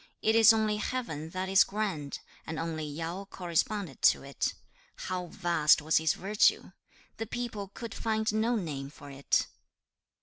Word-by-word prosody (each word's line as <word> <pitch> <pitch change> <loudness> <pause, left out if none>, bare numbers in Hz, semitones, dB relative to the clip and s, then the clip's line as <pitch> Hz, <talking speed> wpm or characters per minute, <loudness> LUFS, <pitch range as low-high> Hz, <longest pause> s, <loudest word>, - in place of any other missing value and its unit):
It 220 - +3
is 225 -1 +8
only 215 -1 +1
Heaven 210 - -3
that 185 +2 -3
is 195 0 +6
grand, 195 -9 -3 0.3
and 160 -1 -4
only 160 -1 -3
Yao 165 +6 -5
corresponded 180 -2 -2
to - - +5
it. 140 0 -2 0.4
How 180 -1 -4
vast 170 -4 +3
was 155 +2 +2
his 160 -1 +2
virtue! 205 +2 +2 0.5
The 225 - -4
people 225 -4 -4
could 230 -2 -6
find 220 -1 -1
no 225 +3 +1
name 145 -9 -4
for 145 -1 -12
it. 140 0 +1
185 Hz, 155 wpm, -30 LUFS, 155-215 Hz, 0.5 s, is